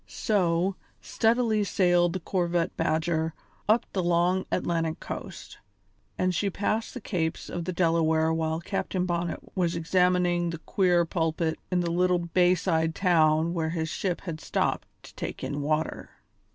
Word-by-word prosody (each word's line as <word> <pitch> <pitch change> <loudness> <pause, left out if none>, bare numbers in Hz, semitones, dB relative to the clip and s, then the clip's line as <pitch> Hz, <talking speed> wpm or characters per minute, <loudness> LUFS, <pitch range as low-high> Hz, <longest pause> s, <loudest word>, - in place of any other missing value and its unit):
So, 185 -3 0 0.2
steadily 225 -2 +1
sailed 175 -3 +2
the 185 - -2
corvette 175 -1 -1
Badger 160 0 0 0.3
up 220 +2 +4
the 190 - 0
long 175 +2 +1
Atlantic 165 -3 -1
coast, - - -8 0.6
and 185 0 +1
she 200 +4 0
passed 215 +4 -2
the - - -4
capes 165 -4 -3
of 175 -1 -4
the 185 - -2
Delaware 160 -2 +2
while 160 0 -1
Captain 185 +1 -2
Bonnet 175 -1 -3
was 175 -2 0
examining 175 0 +2
the 165 - -4
queer 175 +1 +2
pulpit 160 -1 -1
in 180 -1 +1
the 170 -1 -1
little 180 +1 +2
bay 175 +1 +3
side 160 -2 0
town 165 -3 +3
where 160 -2 -1
his 160 -1 -2
ship 180 +1 -2
had 165 -4 -6
stopped - - -1 0.2
to - - -13
take - - -6
in 145 0 -3
water. 155 +2 -1
175 Hz, 150 wpm, -27 LUFS, 160-185 Hz, 0.6 s, up